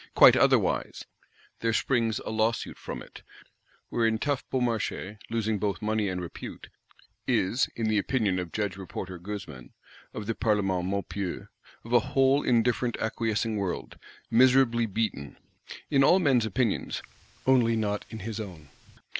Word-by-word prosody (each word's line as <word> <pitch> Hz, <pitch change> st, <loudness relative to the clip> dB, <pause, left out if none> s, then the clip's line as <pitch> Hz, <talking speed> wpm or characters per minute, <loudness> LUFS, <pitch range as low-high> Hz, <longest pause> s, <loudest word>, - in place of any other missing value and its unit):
Quite -, -, +9 dB
otherwise; -, -, +2 dB, 0.5 s
there 115 Hz, -1 st, 0 dB
springs 115 Hz, -2 st, +1 dB
a -, -, -3 dB
Lawsuit 110 Hz, +1 st, 0 dB
from -, -, -6 dB
it: -, -, -14 dB, 0.7 s
wherein 115 Hz, -1 st, +1 dB
tough 140 Hz, +3 st, -1 dB
Beaumarchais, 115 Hz, -5 st, -2 dB
losing 110 Hz, -2 st, -1 dB
both 100 Hz, 0 st, -1 dB
money 110 Hz, -1 st, 0 dB
and 90 Hz, -1 st, -3 dB
repute, 85 Hz, -2 st, -8 dB, 0.6 s
is, 115 Hz, +8 st, +2 dB
in 115 Hz, -, -2 dB
the 110 Hz, -1 st, +2 dB
opinion 100 Hz, -4 st, 0 dB
of 90 Hz, -2 st, -5 dB
Judge 105 Hz, -3 st, -2 dB
Reporter 95 Hz, -1 st, -6 dB
Goezman, 90 Hz, -10 st, -8 dB, 0.4 s
of 105 Hz, -, -6 dB
the 115 Hz, -, -1 dB
Parlement 95 Hz, -5 st, 0 dB
Maupeou, 100 Hz, -1 st, -3 dB, 0.4 s
of 115 Hz, -, -5 dB
a 120 Hz, -, +7 dB
whole 135 Hz, +4 st, +2 dB
indifferent 120 Hz, 0 st, +1 dB
acquiescing 110 Hz, 0 st, -1 dB
world, 95 Hz, -3 st, -4 dB, 0.3 s
miserably 120 Hz, -1 st, +4 dB
beaten. 100 Hz, -10 st, -3 dB, 0.5 s
In 135 Hz, -2 st, +5 dB
all 175 Hz, -, +6 dB
men's 135 Hz, -10 st, +3 dB
opinions, 115 Hz, 0 st, -1 dB, 0.4 s
only 125 Hz, -3 st, +4 dB
not 105 Hz, -2 st, -1 dB
in 110 Hz, -2 st, -8 dB
his 110 Hz, +2 st, -5 dB
own! 85 Hz, -8 st, -8 dB
110 Hz, 140 wpm, -28 LUFS, 100-120 Hz, 0.7 s, Quite